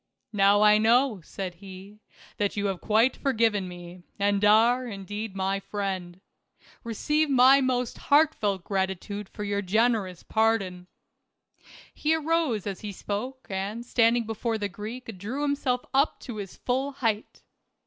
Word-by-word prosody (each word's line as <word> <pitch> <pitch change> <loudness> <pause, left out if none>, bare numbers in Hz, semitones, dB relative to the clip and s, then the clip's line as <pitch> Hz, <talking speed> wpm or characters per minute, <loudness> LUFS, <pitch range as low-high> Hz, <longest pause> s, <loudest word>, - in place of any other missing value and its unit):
"Now 200 +1 +4
I 210 0 +6
know," 230 -1 +3
said 185 +2 -6
he, 195 +2 -11 0.4
"that 205 0 -1
you 205 - 0
have 195 -3 -2
quite 225 +4 +3
forgiven 225 -7 +1
me, 175 0 -10 0.2
and 200 0 +1
are, 230 +4 +4
indeed, 205 0 -6
my 195 +1 -1
friend. 190 -3 -4 0.6
Keceive 300 +7 0
my 265 +1 +6
most 250 -2 -1
heartfelt 280 - +2
gratitude 190 +1 -3
for 210 - -7
your 200 0 -1
generous 205 -2 0
pardon." 200 -5 0 1.1
He 310 +1 +1
arose 320 - 0
as 195 -3 -4
he 210 - -5
spoke 230 +7 -5
and 200 +5 -4
standing 235 -1 +3
before 225 +1 -2
the 205 -1 -3
Greek 215 +2 -8
drew 245 +9 -4
himself 275 -3 0
up 275 +3 +2
to 240 -5 -7
his 200 -3 -7
full 265 +3 -1
height. 225 -5 -2
210 Hz, 140 wpm, -26 LUFS, 195-245 Hz, 1.1 s, I